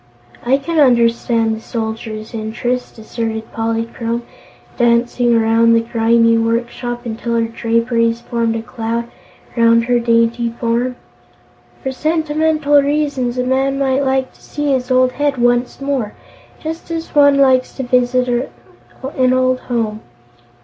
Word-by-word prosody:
"I 260 +3 +3
can 320 +3 -2
understand 235 -3 +3
the 220 - -9
Soldier's 220 -1 -5
interest," 235 +3 -3
asserted 220 0 -5
Polychrome, 230 +1 -2 0.5
dancing 240 0 +2
around 230 +1 +3
the 230 - +5
grimy 230 0 +2
workshop 240 +1 -2
until 235 +1 -3
her 230 - +2
draperies 230 0 0
formed 230 -1 -1
a 225 - -4
cloud 230 0 -4 0.4
around 230 -1 +4
her 245 0 +2
dainty 230 0 +1
form. 240 +2 0 0.9
"For 265 - -2
sentimental 310 0 +1
reasons 280 -4 -1
a 250 - +1
man 265 +2 0
might 270 0 +1
like 265 -1 0
to - - -24
see 295 -1 -3
his 255 -1 -1
old 255 0 +3
head 290 0 -1
once 245 0 +1
more, 275 -6 -2 0.4
just 320 +2 -6
as 330 0 -5
one 285 -1 +5
likes 260 -2 +3
to 265 - -4
revisit 250 0 +1 0.8
an 260 -1 +1
old 255 0 +2
home." 225 -4 -3
240 Hz, 135 wpm, -17 LUFS, 230-265 Hz, 0.9 s, the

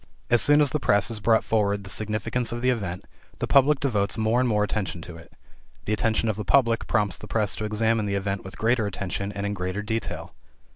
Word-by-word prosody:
As 120 -2 +5
soon 145 +4 +5
as 145 -3 +4
the 150 - 0
press 100 -4 +3
has 115 -2 -4
brought 110 +1 +3
forward 100 -2 0
the 95 - -10
significance 110 +4 -1
of 120 +1 -5
the 130 - +4
event, 95 -7 -4 0.3
the - - -2
public 140 +1 +4
devotes 105 -7 0
more 110 +2 +2
and 125 -1 +2
more 105 -2 +2
attention 95 -3 -2
to 85 -1 -9
it. 80 0 -14 0.5
The 105 - 0
attention 110 +1 +1
of 110 -2 -1
the 105 - -3
public 115 +1 +2
prompts 105 -3 0
the - - -9
press 105 -3 0
to 110 - -3
examine 110 0 0
the 100 - -1
event 100 0 -2
with 95 - -10
greater 115 -1 +1
attention 100 0 -4
and 100 0 -4
in 100 - -1
greater 95 +2 -3
detail. 110 +2 -4
105 Hz, 230 wpm, -25 LUFS, 100-115 Hz, 0.5 s, As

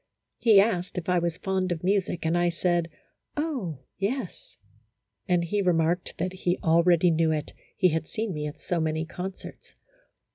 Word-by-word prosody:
He 220 -4 +6
asked 190 -4 +1
if 175 - -4
I 180 -1 +3
was 170 0 -2
fond 190 0 -1
of 165 -1 -3
music, 190 -3 0
and 160 +2 +2
I 175 0 +3
said, 170 0 0 0.5
"oh, 260 - -2 0.2
yes," 210 +1 -4 0.7
and 175 -1 +2
he 200 +5 0
remarked 175 -1 +1
that 185 - -2
he 180 -1 -1
already 170 +1 +4
knew 160 0 +2
it, 150 -2 -3 0.2
he 185 -2 +4
had 160 0 -2
seen 220 -3 -3
me 150 -1 -3
at 150 - -8
so 175 - -2
many 160 0 -1
concerts. 185 +3 -8
175 Hz, 170 wpm, -27 LUFS, 165-190 Hz, 0.7 s, He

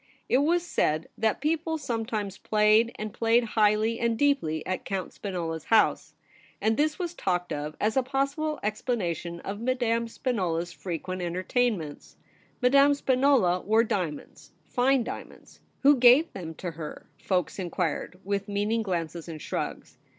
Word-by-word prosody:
It 255 - +3
was 340 +4 +2
said 155 - 0
that 220 +2 0
people 320 +2 0
sometimes 225 -7 -3
played, 215 +2 +3
and 215 -1 -5
played 230 +1 +3
highly 215 +1 +3
and 230 -1 +1
deeply, 195 - +1
at 185 - -3
Count 195 -2 -4
Spinola's 170 -5 -4
house; 220 -2 +2 0.4
and 220 +1 +2
this 305 +4 +1
was 350 -2 -3
talked 180 - -1
of 150 +1 -5
as 215 +1 +1
a 265 - +4
possible 275 +4 -1
explanation 185 - -2
of 205 +2 -6
Madame 235 -2 0
Spinola 190 -9 -1
s 175 - -11
frequent 175 +3 -5
entertainments. 180 - -2 0.5
Madame 275 +3 +6
Spinola 260 -10 +3
wore 220 +4 +3
diamonds, 180 -9 -4
fine 255 0 +2
diamonds. - - -9
' - - -41
Who 285 +1 +7
gave 255 +6 +6
them 165 -4 -7
to 175 +1 -5
her 160 -2 -8
}' - - -39
folks 185 0 0
inquired, 180 0 -2
with 200 0 -2
meaning 205 +3 0
glances 170 -4 -3
and 160 -2 -6
shrugs. - - -5
215 Hz, 150 wpm, -27 LUFS, 180-250 Hz, 0.5 s, Who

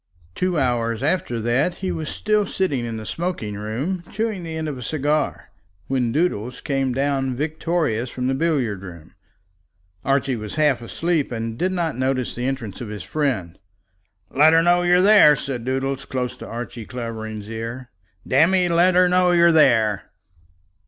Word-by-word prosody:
Two 180 - -1
hours 120 -3 0
after 145 -7 0
that 130 +10 +1
he 185 0 -3
was 155 -2 -4
still 210 -2 0
sitting 145 -13 -1
in 115 -1 -4
the 110 - -7
smoking 170 - -3
room, 120 - -3
chewing 215 -2 -2
the 165 -1 -6
end 160 0 -3
of 150 - -3
a 125 - -8
cigar, 150 +3 -1 0.3
when 125 -2 0
Doodles 125 -6 -1
came 135 -3 -1
down 135 0 0
victorious 150 -4 -1
from 125 +1 -4
the 130 - +1
billiard 135 - 0
room. 85 -5 -11 0.9
Archie 135 -1 +1
was 105 -2 -6
half 150 -5 +2
asleep, 160 +5 -1
and 115 -1 -3
did 185 +9 0
not 170 -6 -1
notice 130 0 -1
the 125 +1 -3
entrance 125 -7 -4
of 120 - -5
his 105 -1 -6
friend. 115 - -2 0.7
"Let 155 +4 +5
her 165 0 +5
know 175 +1 +4
that 175 - 0
you're 180 +1 +5
there," 200 -8 +7
said 130 -4 -5
Doodles, 135 +1 -2
close 125 -3 -3
into - - -10
Archie 120 -1 -7
Clavering's 110 -4 -6
ear, 115 +3 -6 0.4
"damme, 175 +6 +4
let 175 +2 +4
her 180 0 +6
know 180 0 +3
that 175 - +3
you're 170 0 +6
there." 115 -10 +3
135 Hz, 170 wpm, -22 LUFS, 115-165 Hz, 0.9 s, there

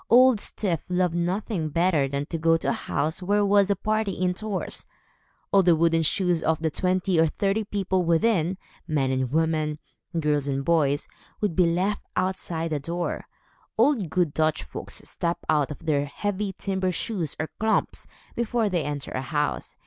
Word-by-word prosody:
Old 250 -1 +6
Styf 185 -5 -2
loved 180 -1 +1
nothing 175 0 -1
better 165 -3 +2
than 140 +1 -2
to 165 +1 -4
go 165 +1 +4
to - - -2
a - - +2
house 160 +5 -2
where 205 +3 +2
was 200 0 +4
a 200 - +3
party 215 0 0
indoors. 185 +3 -2 0.6
All 200 - +6
the 175 -2 +5
wooden 165 0 +3
shoes 175 +1 +1
of 160 -1 +1
the 160 -1 -1
twenty 185 0 +1
or 165 - +5
thirty 200 +6 0
people 195 -2 0
within, 170 +1 +2 0.3
men 140 -4 +1
and 130 -1 -1
women, 155 -1 +1 0.4
girls 150 -2 +1
and 135 0 -1
boys, 145 -4 +2 0.3
would 205 -6 -1
be 180 -2 +4
left 185 +5 0
outside 180 -3 -1
the 150 - 0
door. 170 +4 -3 0.5
All 295 - +5
good 180 - -1
Dutch 155 - +1
folks 65 - -7
step 170 0 -2
out 150 -3 +2
of 150 +2 -9
their 145 -3 +1
heavy 200 +5 -3
timber 190 -2 -1
shoes, 180 -4 -2
or 155 - -2
klomps, 220 0 0 0.3
before 235 -2 0
they 175 -4 0
enter 145 -1 -4
a 130 - -2
house. 145 +3 -2
170 Hz, 170 wpm, -25 LUFS, 155-195 Hz, 0.6 s, Old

